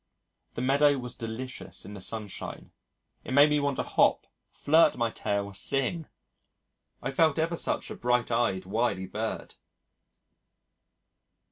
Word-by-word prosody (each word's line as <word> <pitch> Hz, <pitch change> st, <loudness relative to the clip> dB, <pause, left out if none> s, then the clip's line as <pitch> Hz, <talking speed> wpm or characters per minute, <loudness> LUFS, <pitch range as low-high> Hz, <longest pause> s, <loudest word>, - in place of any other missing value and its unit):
The 120 Hz, -, -3 dB
meadow 140 Hz, +2 st, +4 dB
was 125 Hz, -2 st, -6 dB
delicious 120 Hz, +3 st, -6 dB
in 105 Hz, -, -9 dB
the 100 Hz, -, -8 dB
sunshine. 105 Hz, 0 st, -6 dB, 0.5 s
It -, -, -5 dB
made 145 Hz, +1 st, +7 dB
me 150 Hz, -, +3 dB
want 140 Hz, -1 st, 0 dB
to -, -, 0 dB
hop, -, -, +2 dB, 0.3 s
flirt 160 Hz, 0 st, +4 dB
my 115 Hz, -1 st, 0 dB
tail, 100 Hz, -1 st, -2 dB
sing. 135 Hz, -, -1 dB, 1.0 s
I 135 Hz, -, -2 dB
felt 155 Hz, +1 st, +3 dB
ever 165 Hz, +1 st, 0 dB
such -, -, -1 dB
a -, -, -5 dB
bright 125 Hz, -1 st, 0 dB
eyed 115 Hz, -6 st, +1 dB
wily 105 Hz, -1 st, 0 dB
bird! 110 Hz, +4 st, -4 dB
125 Hz, 135 wpm, -28 LUFS, 110-140 Hz, 1.0 s, made